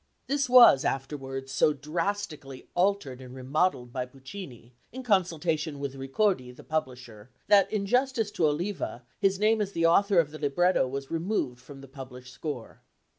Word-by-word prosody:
This 280 -2 0
was 245 - +8
afterwards 135 -1 -4
so 140 +2 +3
drastically 155 -3 -4
altered 175 -9 0
and 130 0 -11
remodelled 130 -1 -1
by 125 -1 -3
Puccini, 135 - -11 0.2
in 260 +2 -7
consultation 165 - 0
with 140 -1 -4
Ricordi, 135 +2 0
the - - -13
publisher, 125 -7 -5 0.2
that 200 -1 +5
in 205 -2 -1
justice 245 -1 +1
to 170 -6 +2
Oliva, 150 -5 -3 0.2
his 195 -1 +2
name 215 +2 +2
as 200 -1 -3
the 165 0 +1
author 200 +4 +4
of 155 -3 +1
the 155 - -9
libretto 155 +1 +2
was 135 +1 -6
removed 165 - -2
from 135 +1 -12
the 135 - -12
published 130 -2 -11
score. 145 -7 -7
150 Hz, 160 wpm, -28 LUFS, 135-195 Hz, 0.2 s, was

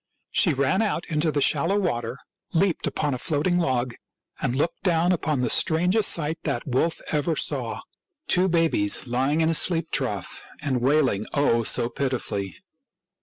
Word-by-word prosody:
She 165 -6 +2
ran 140 +9 +1
out 205 -6 -1
into 155 +1 +1
the 145 -1 -1
shallow 165 +8 +2
water, 120 - -2 0.4
leaped 180 0 +1
upon 145 -2 -1
a 125 - -4
floating 165 +6 0
log, 130 -6 0 0.5
and 120 - -1
looked 160 +5 -1
down 175 -1 +2
upon 155 -6 0
the 125 - +1
strangest 180 +6 +3
sight 160 0 0
that 140 -6 -3
wolf 135 +6 0
ever 155 +2 0
saw - - -1 0.2
— 350 -6 -53
two 185 +1 +2
babies 165 - +2
lying 135 +6 0
in 160 - +2
a - - +2
sheep 165 0 +2
trough 105 -9 -3 0.2
and 130 -4 -1
wailing, 130 -6 +2
oh, 140 -5 +3
so 115 +1 +1
pitifully 120 -8 -3
150 Hz, 165 wpm, -24 LUFS, 130-170 Hz, 0.5 s, strangest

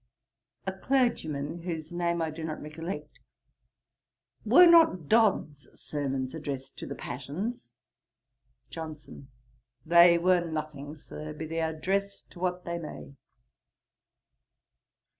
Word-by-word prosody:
A 190 - -2
CLERGYMAN: 175 - 0
(whose 165 -3 -5
name 170 -1 0
I 160 - -2
do 160 +1 -7
not 155 -1 -4
recollect.) 165 +5 -7 1.2
'Were 360 - +8
not 325 - +6
Dodd's 190 - +2
sermons 135 -3 -3
addressed 140 -4 -5
to - - -7
the - - -5
passions?' 145 - -5 1.0
JOHNSON. 155 -4 -8 0.6
'They 170 +1 +7
were 180 0 +3
nothing, 155 -2 -5
Sir, 155 +1 -8
be 155 +1 -6
they 165 +1 -2
addressed 190 +5 -2
to 175 - -13
what 180 0 -2
they 170 0 -3
may.' 150 -3 -8
165 Hz, 110 wpm, -29 LUFS, 150-180 Hz, 1.2 s, Were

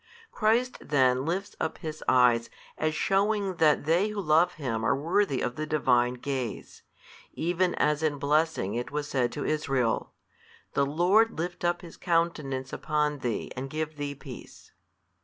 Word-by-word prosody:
Christ 235 +4 +1
then 130 -2 +2
lifts 195 +4 -2
up 160 - -2
His 155 -1 -6
Eyes 125 -2 +4 0.3
as 155 0 -1
shewing 195 0 +1
that 150 -3 +3
they 170 +6 +3
who 210 -1 -4
love 170 0 +3
Him 115 -7 -3
are - - +3
worthy 165 0 +1
of 125 0 -2
the 155 0 -3
Divine 125 -5 +2
Gaze, 130 -2 -5 0.5
even 175 +2 0
as 150 0 +1
in 155 -2 0
blessing 150 -6 +1
it 120 +1 -3
was 145 0 -3
said 125 -4 0
to 145 - -4
Israel, 135 -6 0 0.6
The 140 - +2
Lord 185 +9 +3
lift 175 +2 -4
up 175 0 +1
His 170 - -11
Countenance 165 -6 -1
upon 150 -1 -1
thee 120 -4 -3
and 135 +1 -5
give 155 +1 -4
thee 145 -1 -4
peace. 135 -3 -12
150 Hz, 160 wpm, -28 LUFS, 130-175 Hz, 0.6 s, Eyes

